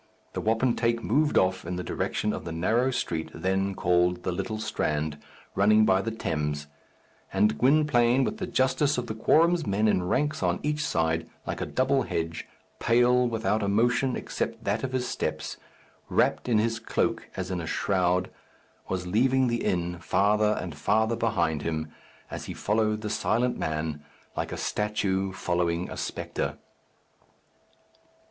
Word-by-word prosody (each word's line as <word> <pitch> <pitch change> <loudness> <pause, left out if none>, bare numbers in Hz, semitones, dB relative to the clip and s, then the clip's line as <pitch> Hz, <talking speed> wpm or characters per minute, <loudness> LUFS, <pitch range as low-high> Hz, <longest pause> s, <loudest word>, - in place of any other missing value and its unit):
The - - -3
wapentake 115 +1 +1
moved 145 +6 +2
off 95 0 +2
in 90 +2 -4
the 90 - -3
direction 105 +3 -1
of - - -5
the 85 - -5
narrow 110 +10 +1
street 80 -10 -2
then 95 +3 0
called 90 0 +2
the - - -1
Little 95 +4 -3
Strand, 75 -7 -2 0.3
running 110 +2 +5
by 95 -1 +3
the 115 - -2
Thames; 75 -8 -2 0.7
and 105 +3 +2
Gwynplaine, 130 -2 +4
with 210 +10 -2
the 185 - -3
justice 130 +1 +2
of 125 - -1
the 110 - -4
quorum's 165 +9 +3
men 105 +2 +2
in 100 - +3
ranks 150 - 0
on - - +1
each 150 +1 0
side, 80 - 0 0.2
like - - -4
a - - -2
double - - +2
hedge, 80 0 -3 0.3
pale, 125 +1 +4
without 110 -1 0
a 100 - 0
motion 120 +5 +2
except - - -4
that 105 +3 -1
of 130 - -2
his 130 -1 -1
steps, - - -3 0.5
wrapped - - +1
in 115 - +4
his 115 +1 +1
cloak 115 - -1
as 95 0 -3
in 90 -2 -2
a 80 - -6
shroud, 90 -1 +1 0.6
was 90 -1 -2
leaving 125 +7 +2
the 120 0 -1
inn 85 -1 -1
farther 105 +5 +2
and 90 -3 -5
farther 110 +9 +1
behind 85 -10 0
him 80 -1 -3 0.4
as - - -5
he - - -6
followed 110 0 0
the 105 - -3
silent 120 +3 +1
man, 75 -1 -3 0.3
like - - -3
a - - -4
statue 100 -2 -1
following 85 -2 -1
a - - -5
spectre. - - -3
105 Hz, 160 wpm, -27 LUFS, 90-120 Hz, 0.7 s, running